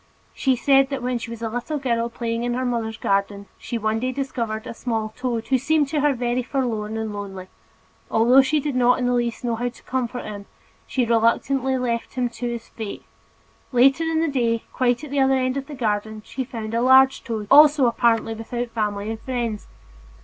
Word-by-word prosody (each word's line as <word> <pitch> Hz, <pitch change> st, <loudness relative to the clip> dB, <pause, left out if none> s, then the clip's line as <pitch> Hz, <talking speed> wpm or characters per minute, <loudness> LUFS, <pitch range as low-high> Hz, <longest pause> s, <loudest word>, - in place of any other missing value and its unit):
She 265 Hz, -2 st, +1 dB
said 270 Hz, +2 st, +4 dB
that 275 Hz, -3 st, -4 dB
when 250 Hz, -1 st, -1 dB
she 230 Hz, -, -7 dB
was 230 Hz, 0 st, -7 dB
a 225 Hz, -, -1 dB
little 245 Hz, +7 st, -3 dB
girl 235 Hz, -4 st, -1 dB
playing 230 Hz, 0 st, -3 dB
in 240 Hz, 0 st, -1 dB
her 255 Hz, +1 st, -1 dB
mother's 230 Hz, -2 st, -2 dB
garden, 200 Hz, 0 st, -1 dB
she 235 Hz, -, -4 dB
one 220 Hz, 0 st, 0 dB
day 255 Hz, +2 st, -1 dB
discovered 235 Hz, -5 st, -3 dB
a -, -, -6 dB
small 225 Hz, -2 st, -3 dB
toad 240 Hz, -3 st, -3 dB
who 260 Hz, -1 st, +3 dB
seemed 295 Hz, +1 st, +1 dB
to 295 Hz, 0 st, 0 dB
her 295 Hz, 0 st, +3 dB
very 245 Hz, 0 st, -1 dB
forlorn 230 Hz, -5 st, -2 dB
and 220 Hz, -1 st, -3 dB
lonely, 195 Hz, -2 st, -7 dB, 0.6 s
although 240 Hz, +4 st, +5 dB
she 295 Hz, +3 st, +1 dB
did 290 Hz, -2 st, -3 dB
not 250 Hz, 0 st, +4 dB
in 250 Hz, -, -1 dB
the 245 Hz, -, +2 dB
least 240 Hz, -1 st, -1 dB
know 235 Hz, -1 st, 0 dB
how 245 Hz, +1 st, -1 dB
to 240 Hz, -, -18 dB
comfort 250 Hz, -1 st, -3 dB
him, 205 Hz, -1 st, -8 dB, 0.4 s
she 255 Hz, -2 st, 0 dB
reluctantly 245 Hz, +3 st, +2 dB
left 235 Hz, -2 st, -2 dB
him 250 Hz, -1 st, 0 dB
to 240 Hz, +1 st, -5 dB
his 235 Hz, -1 st, -5 dB
fate; 220 Hz, -3 st, -7 dB, 0.7 s
later 270 Hz, +5 st, +4 dB
in 325 Hz, 0 st, +1 dB
the 330 Hz, -, +1 dB
day, 235 Hz, -5 st, 0 dB
quite 245 Hz, +1 st, +1 dB
at 300 Hz, -, -8 dB
the 285 Hz, -, 0 dB
other 265 Hz, 0 st, +4 dB
end 255 Hz, 0 st, 0 dB
of 275 Hz, 0 st, -4 dB
the 300 Hz, -, -8 dB
garden, 215 Hz, -2 st, -2 dB
she 260 Hz, +3 st, -4 dB
found 225 Hz, -3 st, -6 dB
a 230 Hz, -, +1 dB
large 265 Hz, +1 st, +5 dB
toad, 220 Hz, -3 st, -4 dB
also 295 Hz, -1 st, +7 dB
apparently 230 Hz, -1 st, +2 dB
without 235 Hz, +2 st, -4 dB
family 210 Hz, -1 st, -2 dB
and 225 Hz, -, -5 dB
friends. 235 Hz, -5 st, -3 dB
240 Hz, 210 wpm, -23 LUFS, 225-260 Hz, 0.7 s, also